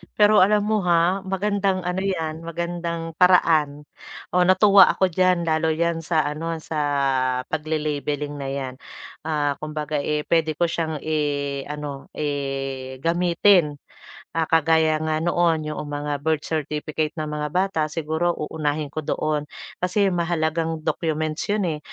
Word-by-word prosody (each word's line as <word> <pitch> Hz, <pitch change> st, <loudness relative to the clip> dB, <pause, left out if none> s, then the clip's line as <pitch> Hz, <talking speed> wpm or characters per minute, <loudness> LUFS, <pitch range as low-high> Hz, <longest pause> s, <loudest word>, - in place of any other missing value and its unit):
Pero 210 Hz, 0 st, +5 dB
alam 205 Hz, +2 st, +4 dB
mo, 215 Hz, +1 st, +1 dB
ha, 175 Hz, +2 st, +3 dB
magandang 195 Hz, -1 st, 0 dB
ano 180 Hz, +1 st, -2 dB
'yan, 165 Hz, -4 st, -3 dB
magandang 170 Hz, 0 st, -4 dB
paraan. 160 Hz, -5 st, +4 dB, 0.5 s
Oh, 180 Hz, 0 st, +3 dB
natuwa 195 Hz, +1 st, +7 dB
ako 190 Hz, -1 st, +1 dB
diyan 180 Hz, 0 st, +2 dB
lalo 160 Hz, -1 st, +1 dB
'yan 170 Hz, +1 st, 0 dB
sa 160 Hz, -1 st, +1 dB
ano, 155 Hz, +3 st, -3 dB
sa 160 Hz, -, -5 dB, 0.7 s
pagle-labeling 150 Hz, -2 st, -2 dB
na 135 Hz, -, -4 dB
'yan. 135 Hz, -1 st, -4 dB, 0.5 s
Ah, 145 Hz, -2 st, +1 dB
kumbaga, 150 Hz, 0 st, -3 dB
eh, 150 Hz, +1 st, -1 dB
pwede 160 Hz, -2 st, +2 dB
ko 175 Hz, -, +2 dB
siyang, 160 Hz, -1 st, -2 dB
eh, 145 Hz, -3 st, -1 dB
ano, 145 Hz, -2 st, -6 dB
eh, 135 Hz, -3 st, -3 dB
gamitin. 170 Hz, -1 st, +3 dB, 0.6 s
Ah, 165 Hz, -1 st, +1 dB
kagaya 160 Hz, -1 st, +3 dB
nga 155 Hz, 0 st, 0 dB
noon, 165 Hz, -2 st, +1 dB
'yoong 150 Hz, -1 st, -5 dB
mga 145 Hz, 0 st, -3 dB
birth 160 Hz, -1 st, 0 dB
certificate 155 Hz, 0 st, -2 dB
ng 155 Hz, -1 st, -3 dB
mga 150 Hz, 0 st, -3 dB
bata, 185 Hz, -2 st, +1 dB
siguro 160 Hz, +2 st, -1 dB
uunahin 150 Hz, -1 st, -3 dB
ko 155 Hz, -, -3 dB
doon. 150 Hz, -1 st, -1 dB, 0.4 s
Kasi 195 Hz, +2 st, +2 dB
mahalagang 165 Hz, -1 st, -1 dB
documents 155 Hz, -1 st, -1 dB
'yon, 205 Hz, -1 st, +1 dB
eh. -, -, -13 dB
160 Hz, 140 wpm, -23 LUFS, 150-175 Hz, 0.7 s, natuwa